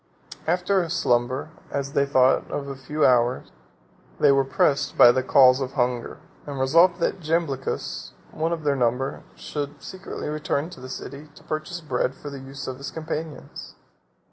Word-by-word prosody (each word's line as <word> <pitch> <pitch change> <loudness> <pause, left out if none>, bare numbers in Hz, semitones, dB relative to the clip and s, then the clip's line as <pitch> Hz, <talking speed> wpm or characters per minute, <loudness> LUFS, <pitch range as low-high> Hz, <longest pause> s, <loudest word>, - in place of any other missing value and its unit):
After 180 +3 +2
a 170 - -4
slumber, 130 -3 0 0.2
as 140 0 -3
they 140 0 +2
thought 130 -1 +3
of 140 - -4
a 135 - -5
few 150 +3 -1
hours, 125 0 +2 0.7
they - - +6
were 135 0 +4
pressed 140 +1 +1
by 120 - +9
the 130 - +1
calls 130 0 +5
of 130 0 -3
hunger; 125 -3 -1 0.3
and 140 -2 -5
resolved 170 +7 +4
that 190 - 0
Jamblichus, 155 -5 -2 0.2
one 160 +1 -1
of 165 -2 -3
their 145 -1 +2
number, 125 +1 0
should 145 -1 -5
secretly 190 0 -7
return 150 +1 -2
to - - -11
the 130 0 -9
city 140 +3 -8
to - - -16
purchase 155 +3 -4
bread 130 -3 -1
for 145 - -8
the 140 - -7
use 135 0 -8
of 130 -1 -5
his 140 +1 -6
companions. 160 -1 -6
140 Hz, 170 wpm, -24 LUFS, 130-155 Hz, 0.7 s, by